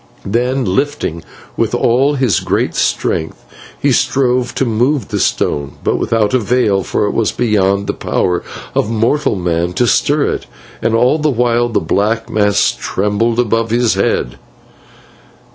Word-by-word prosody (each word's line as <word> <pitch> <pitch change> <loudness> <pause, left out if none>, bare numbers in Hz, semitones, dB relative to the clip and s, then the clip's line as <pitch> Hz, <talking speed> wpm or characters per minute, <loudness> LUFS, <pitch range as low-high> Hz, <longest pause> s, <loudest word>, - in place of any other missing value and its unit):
Then, 125 +5 0
lifting 95 - -2 0.3
with - - 0
all 135 +5 +2
his 130 - +1 0.3
strength, 80 - -1 0.3
he - - +2
strove 125 -2 +1
to 135 - 0
move 120 +2 0
the - - -2
stone, 70 -1 -1
but - - +1
without 110 -2 0
avail, 120 -4 +2
for 105 - -1
it 105 - -1
was 115 - +1
beyond 100 -4 +1
the - - -2
power 90 -1 -1 0.3
of 105 - 0
mortal 115 +5 +1
man 85 -1 -1
to 120 - +1
stir 145 +5 +2
it, - - -4 0.3
and 115 - +1
all 125 +7 +3
the 155 0 +1
while 120 -2 +1
the 115 - +1
black 105 +7 -1
mass 105 -1 +2
trembled 105 +4 -1
above 115 -1 +1
his 120 0 +2
head. 60 -10 -1
115 Hz, 145 wpm, -15 LUFS, 100-125 Hz, 0.3 s, all